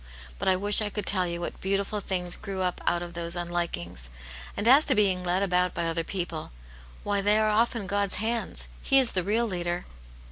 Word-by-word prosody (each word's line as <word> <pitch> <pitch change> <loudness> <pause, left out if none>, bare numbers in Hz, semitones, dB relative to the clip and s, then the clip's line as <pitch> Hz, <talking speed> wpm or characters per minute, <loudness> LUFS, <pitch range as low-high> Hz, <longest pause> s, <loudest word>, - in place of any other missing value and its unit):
But - - -3
I 190 - +4
wish 205 +3 +3
I 210 - -1
could 205 -1 -5
tell 185 -3 +3
you 170 0 -4
what - - -6
beautiful 200 +2 -1
things 180 -3 -2
grew 190 -1 -5
up 180 -1 -2
out 175 0 +1
of 175 0 -9
those 170 0 -3
unlikings. 170 - -3 0.5
And 215 - -1
as 275 +5 +8
to 265 - +5
being 190 -4 +2
led 180 +2 +1
about 180 -1 +1
by 170 - -1
other 165 0 -1
people; 170 - -5 0.5
why, 205 -1 0
they 205 +2 +3
are 215 0 +2
often 230 0 +1
God's 200 +1 0
hands. 225 +3 +1
He 270 - +3
is 260 -3 +5
the 185 - 0
real 220 +5 +1
leader." 175 -3 -3
190 Hz, 210 wpm, -27 LUFS, 175-210 Hz, 0.5 s, as